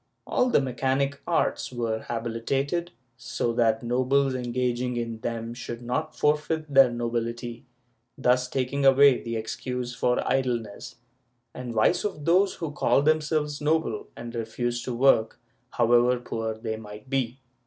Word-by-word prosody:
All 250 - +1
the - - +4
mechanic 135 +2 -1
arts - - 0
were 115 -3 -2
"habilitated," 120 +9 -2 0.3
so 120 - -2
that 115 -1 +2
nobles 130 +3 +2
engaging 125 0 -1
in 115 -1 -3
them 115 0 -4
should 120 -1 -7
not 125 +6 -2
forfeit 150 0 0
their 135 -2 +7
nobility, 120 +1 -4 0.5
thus 125 +1 +2
taking 135 +2 -1
away 135 0 +6
the 115 -1 -4
excuse 125 +2 -4
for 125 0 0
idleness 120 -5 -2 0.6
and 125 -1 -6
vice 110 - +3
of 150 -8 -4
those 185 +3 +3
who 165 -3 -4
called 145 -1 +2
themselves 150 -1 +1
noble 150 -7 0
and 115 0 -7
refused 120 +1 -3
to 125 - -3
work, 115 -3 +3 0.3
however 120 +1 +3
poor 115 -2 -4
they 110 0 -4
might 105 0 -11
be. 130 -2 -1
125 Hz, 140 wpm, -26 LUFS, 115-140 Hz, 0.6 s, their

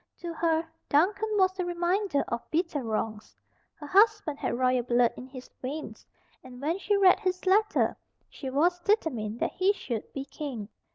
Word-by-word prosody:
To 340 -1 -4
her, 325 0 +1 0.2
Duncan 390 +9 +2
was 375 -1 +2
a - - +1
reminder 350 -2 0
of 235 0 -4
bitter 325 -3 0
wrongs. 220 -2 -4 0.4
Her 295 - -10
husband 405 -4 +3
had - - -1
royal 255 0 +2
blood 240 0 +2
in 255 - -9
his 255 -1 -10
veins, 290 +4 -6 0.4
and 250 -1 -11
when 320 +7 -1
she 410 +1 +1
read 380 -2 +6
his 370 0 -2
letter, 420 +3 +3 0.3
she 270 - -7
was 340 +7 +2
determined 270 - 0
that - - +1
he 380 +2 +2
should 240 - -5
be 275 -1 -5
King. 265 -7 -6
315 Hz, 170 wpm, -28 LUFS, 255-375 Hz, 0.4 s, read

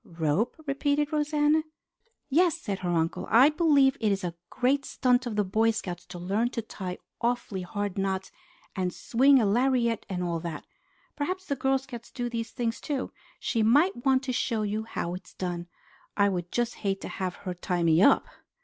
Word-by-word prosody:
"Rope?" 165 +7 -1
repeated 285 +2 0
Rosanna. 300 +1 +2 0.7
"Yes," 335 +4 +3
said 200 - -4
her 180 - -3
uncle. 165 -1 0
"I 245 +7 +7
believe 290 -4 +4
it 215 -3 +2
is 195 -1 -1
a 175 -1 -2 0.2
great 270 +3 +1
stunt 250 -2 +1
of 225 - -3
the 210 - +2
Boy 220 +4 +2
Scouts 180 -6 -4
to - - -8
learn 200 +7 0
to 230 - 0
tie 185 -4 -6 0.2
awfully 235 -5 -1
hard 200 +2 -3
knots 190 -1 -2 0.4
and 185 -2 -1
swing 265 +8 +4
a 225 - +2
lariat 235 +1 +1
and 180 -2 -2
all 170 -1 -1
that. 165 -1 -6 0.5
Perhaps 370 +6 -3
the 280 - -1
Girl 270 +1 +2
Scouts 255 -3 -9
do 245 -2 -3
these 230 -1 -3
things 230 +1 -3
too. 280 -4 -3 0.3
She 230 - 0
might 285 - +4
want 265 -1 +3
to 260 -1 -2
show 225 -2 0
you 210 +1 -2
how 175 -6 -3
it 180 - -8
is - - -16
done. 175 -1 -4 0.5
I 200 -1 +4
would 175 -2 -3
just 240 0 0
hate 195 -2 0
to - - -5
have 185 -2 -3
her 185 - -2
tie 180 0 -2
me 165 +1 +4
up!" 275 - +5
225 Hz, 195 wpm, -28 LUFS, 185-270 Hz, 0.7 s, I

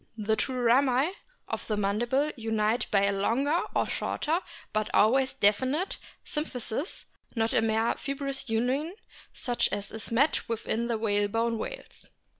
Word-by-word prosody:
The 220 0 +1
two 260 +3 -2
rami 255 +5 +4 0.4
of - - -4
the 215 - 0
mandible 240 +9 +1
unite 225 -1 0
by 200 -2 +3
a 200 - +2
longer 265 - +1
or - - +3
shorter, 325 +3 0 0.3
but 215 0 0
always 260 +5 +4
definite, 260 - +2 0.3
symphysis, 285 - -3 0.3
not 225 -1 +1
a - - +4
mere 225 +1 +2
fibrous 275 -1 -4
union 260 - 0 0.4
such 245 -1 0
as 205 0 -3
is 220 0 -5
met 270 +4 +2
with 230 -1 -3
in 235 +2 0
the 235 -2 0
whalebone 220 +2 +1
whales. - - -7
235 Hz, 145 wpm, -28 LUFS, 220-270 Hz, 0.4 s, rami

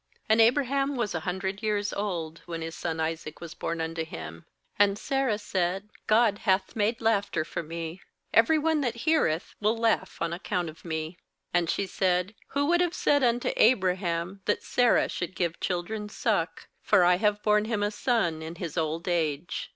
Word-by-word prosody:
5And 220 - +5
Abraham 275 +4 +3
was 235 -5 -1
a 165 - -1
hundred 190 +2 -3
years 205 -2 0
old, 170 -6 -3
when 165 -1 -4
his 165 0 -5
son 165 -1 -3
Isaac 160 -1 -3
was 170 -1 -8
born 170 0 -3
unto 160 0 -2
him. 80 - -8 0.3
6And 200 -1 +4
Sarah 270 -3 0
said: 190 0 -2 0.2
'God 215 -2 +4
hath 190 -2 +1
made 225 +2 +1
laughter 205 -7 +1
for - - -4
me; 165 +2 -6 0.3
every 230 +8 +5
one 310 0 +1
that 245 -4 -1
heareth 240 - +1
will 215 +2 +1
laugh 225 -5 0
on 170 0 -1
account 175 -1 -2
of 155 - -19
me.' 160 +1 -4 0.3
7And 175 -2 +2
she 200 - 0
said: 185 +1 0
'Who 285 +1 0
would 345 +3 +3
have 350 -1 0
said 285 -1 +3
unto 240 0 +2
Abraham, 185 -4 +2
that 205 - 0
Sarah 245 -1 +3
should 180 +1 -4
give 170 -2 -1
children 210 +4 -3
suck? - - -1
for - - +4
I 175 0 +5
have 210 +1 +1
borne 210 0 +3
him 215 -2 -1
a 205 - 0
son 210 -9 0
in 160 +1 -6
his 170 -1 -4
old 160 +2 -2
age.' 165 -2 -1
190 Hz, 180 wpm, -28 LUFS, 170-225 Hz, 0.3 s, 5And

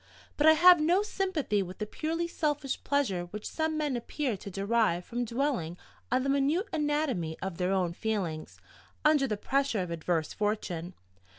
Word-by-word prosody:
But 295 - +3
I 315 - +9
have 350 +1 +7
no 350 +6 +3
sympathy 375 - -1
with 185 0 -6
the 215 - -3
purely 325 +9 -2
selfish 295 -4 -2
pleasure 245 -12 0
which 210 +4 -7
some 315 -1 -1
men 295 -4 0
appear 245 +1 -2
to 200 - -8
derive 200 -2 +1
from 240 +1 -2
dwelling 235 - -1 0.3
on 255 +1 +2
the 275 - -1
minute 280 +8 +2
anatomy 295 - -1
of 190 -2 -5
their 180 +1 +1
own 180 -3 +1
feelings, 180 -7 -3 0.5
under 300 -3 +4
the 210 -3 -2
pressure 270 0 0
of 175 - -6
adverse 165 -1 -1
fortune. 190 -5 -2
240 Hz, 170 wpm, -29 LUFS, 185-300 Hz, 0.5 s, I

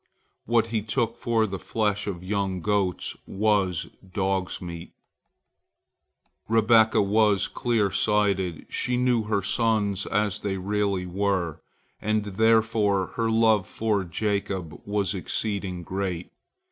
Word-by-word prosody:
What 115 0 +2
he 110 -2 0
took 115 +2 -1
for 115 -2 +1
the 95 -3 -5
flesh 105 -1 -1
of 90 -3 -4
young 95 -1 -1
goats 100 -2 0
was 100 -4 +1 0.3
dog's 95 -2 -1
meat. 85 -1 -8 1.6
Rebekah 110 -1 +5
was 105 0 +3
more - - -21
clear 110 -5 +2
sighted. 100 -6 +1
She 125 0 -1
knew 125 -3 +2
her 105 -2 0
sons 100 -1 +1
as 105 0 0
they 100 -2 -2
really 100 -1 -1
were, 90 -3 -1 0.4
and 110 0 +1
therefore 110 -1 +2
her 115 -1 0
love 110 -3 +3
for 105 -3 0
Jacob 95 -4 -3
was 100 -1 0
exceeding 95 -1 -3
great. 90 -1 -3
100 Hz, 120 wpm, -26 LUFS, 95-110 Hz, 1.6 s, Rebekah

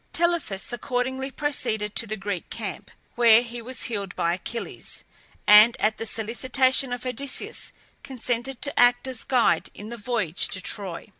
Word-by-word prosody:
Telephus 335 - 0
accordingly 260 +1 -2
proceeded 220 -8 -2
to 230 - +5
the 215 +1 -4
Greek 195 -3 -4
camp, 210 -5 -6 0.2
where 235 -1 +6
he 240 0 -7
was 255 +2 -4
healed 200 -5 -3
by 170 0 +1
Achilles, 225 +6 -6 0.4
and, 215 +3 +8
at 215 0 +1
the 225 - -3
solicitation 255 +4 +1
of 245 +1 -4
Odysseus, 255 +2 -4 0.3
consented 250 0 -3
to 285 +2 -1
act 245 +1 +5
as 255 -3 -5
guide 250 -3 +2
in 210 +1 -9
the 235 - -6
voyage 210 -7 -1
to 185 - -4
Troy. 190 +1 -4
235 Hz, 155 wpm, -25 LUFS, 210-260 Hz, 0.4 s, and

